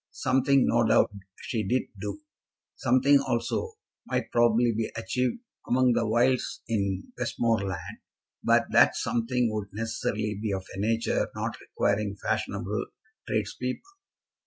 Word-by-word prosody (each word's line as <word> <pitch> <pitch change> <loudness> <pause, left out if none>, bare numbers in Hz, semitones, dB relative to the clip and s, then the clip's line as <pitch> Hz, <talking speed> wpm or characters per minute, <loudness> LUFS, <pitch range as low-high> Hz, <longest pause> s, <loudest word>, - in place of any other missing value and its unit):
Something 135 0 +2
no 120 0 +3
doubt - - +4 0.3
she 115 - -1
did 125 +6 +1 0.2
do. 305 - -5 0.5
Something 135 +2 +4
also 130 - -1 0.3
might - - -2
probably 120 0 +4
be 110 0 -1
achieved 125 - -1 0.3
among 125 0 +4
the 115 -1 +1
wilds 120 +3 +1
in 100 -4 -2
Westmoreland, 110 -5 -1 0.4
but - - +4
that - - +6
something 120 0 0
would 105 -2 -3
necessarily 110 -1 -2
be 110 -2 -1
of 95 -1 -3
a - - -6
nature 115 +3 +1
not - - -3
requiring 100 0 -1
fashionable 100 +1 -2 0.4
tradespeople. 115 - -2
115 Hz, 125 wpm, -27 LUFS, 105-125 Hz, 0.5 s, that